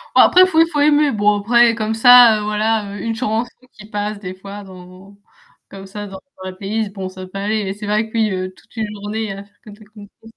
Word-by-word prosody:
Ouais -, -, +7 dB
après, 365 Hz, -, +6 dB
il -, -, +4 dB
faut 320 Hz, -3 st, +1 dB
il 330 Hz, -, +2 dB
faut 295 Hz, -, -1 dB
aimer. 295 Hz, 0 st, +3 dB
Bon 205 Hz, -2 st, +1 dB
après, 235 Hz, +2 st, +3 dB
comme 220 Hz, -1 st, -2 dB
ça, 240 Hz, -1 st, +7 dB
heu, -, -, -5 dB
voilà, 210 Hz, -1 st, -1 dB
heu, 190 Hz, -, -7 dB
une 225 Hz, -1 st, -3 dB
chanson 230 Hz, 0 st, -2 dB, 0.2 s
qui 210 Hz, -, -14 dB
passe 210 Hz, 0 st, -4 dB
des 185 Hz, -2 st, -7 dB
fois 200 Hz, +2 st, -10 dB
dans 185 Hz, +1 st, -15 dB, 0.5 s
comme 195 Hz, 0 st, -11 dB
ça 205 Hz, +1 st, -8 dB
dans 190 Hz, -1 st, -10 dB, 0.2 s
dans 185 Hz, -, -5 dB
ma -, -, -9 dB
playlist 200 Hz, +1 st, -4 dB
bon 190 Hz, -2 st, -6 dB
ça 185 Hz, 0 st, -10 dB
peut 195 Hz, -, -9 dB
aller. 210 Hz, +1 st, -1 dB
Mais 190 Hz, 0 st, -4 dB
c'est 210 Hz, +1 st, -9 dB
vrai 215 Hz, +2 st, 0 dB
que -, -, -24 dB
oui, 220 Hz, -1 st, +2 dB
heu, 185 Hz, 0 st, -4 dB
toute -, -, -24 dB
une 220 Hz, -1 st, -3 dB
journée 210 Hz, +1 st, -5 dB
à 195 Hz, +1 st, -9 dB
faire 200 Hz, +1 st, -30 dB
que 215 Hz, -, -15 dB
de 205 Hz, -, -15 dB
la 215 Hz, -, -16 dB
country, 205 Hz, -2 st, -13 dB
c'est -, -, -14 dB
210 Hz, 270 wpm, -18 LUFS, 195-225 Hz, 0.5 s, Ouais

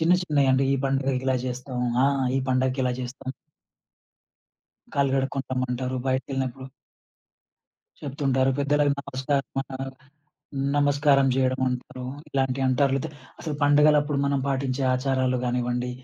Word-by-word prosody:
చిన్న 165 Hz, +2 st, +4 dB
చిన్నయంటే 135 Hz, -5 st, +3 dB
ఈ -, -, +1 dB
పండుగకి 135 Hz, -1 st, 0 dB
ఇలా 130 Hz, -, +3 dB
జేస్తాం 125 Hz, 0 st, -4 dB, 0.3 s
ఆ! -, -, +5 dB, 0.3 s
ఈ -, -, 0 dB
పండగకి 130 Hz, +1 st, +1 dB
ఇలా 125 Hz, -, +1 dB
జేస్తాం. 130 Hz, +1 st, -6 dB, 1.6 s
కాళ్ళు 140 Hz, -1 st, +2 dB
గడుక్కొని 135 Hz, 0 st, -1 dB
రమ్మంటారు 130 Hz, 0 st, -2 dB
బయటకేళ్ళినప్పుడు. 130 Hz, 0 st, -2 dB, 1.3 s
చెప్తుంటారు. 135 Hz, -2 st, +1 dB
పెద్దలకు 145 Hz, 0 st, +2 dB
నమస్కారమనో 135 Hz, 0 st, -2 dB, 1.0 s
నమస్కారం 145 Hz, -1 st, +4 dB
జేయడమంటారు 130 Hz, -1 st, -1 dB, 0.3 s
ఇలాంటియంటారు 135 Hz, 0 st, +1 dB
లేతే 145 Hz, +3 st, -2 dB, 0.3 s
అసలు 155 Hz, -3 st, -4 dB
పండుగలప్పుడు 145 Hz, 0 st, +4 dB
మనం 140 Hz, 0 st, +1 dB
పాటించే 135 Hz, 0 st, -1 dB
ఆచారాలు 130 Hz, -1 st, +1 dB
గానివ్వండి 125 Hz, 0 st, -1 dB
135 Hz, 105 wpm, -25 LUFS, 130-140 Hz, 1.6 s, ఆ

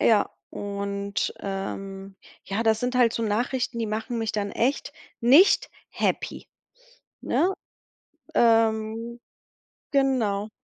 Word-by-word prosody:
Ja, 215 Hz, -3 st, +4 dB, 0.2 s
und, 200 Hz, 0 st, -3 dB
ähm 195 Hz, 0 st, -5 dB, 0.3 s
ja, 200 Hz, +3 st, -2 dB
das 220 Hz, -1 st, +2 dB
sind 250 Hz, +1 st, -1 dB
halt 245 Hz, -2 st, +4 dB
so 230 Hz, -, -2 dB
Nachrichten, 240 Hz, +3 st, -1 dB
die 225 Hz, -, -1 dB
machen 220 Hz, +3 st, -3 dB
mich 225 Hz, -1 st, -2 dB
dann 205 Hz, -1 st, -2 dB
echt 255 Hz, +7 st, -1 dB, 0.3 s
nicht 280 Hz, +12 st, +6 dB, 0.2 s
happy, -, -, -2 dB, 0.7 s
ne? 370 Hz, +3 st, +1 dB, 0.8 s
Ähm 225 Hz, 0 st, +2 dB, 0.7 s
genau. 235 Hz, -7 st, +1 dB
225 Hz, 105 wpm, -25 LUFS, 200-240 Hz, 0.8 s, nicht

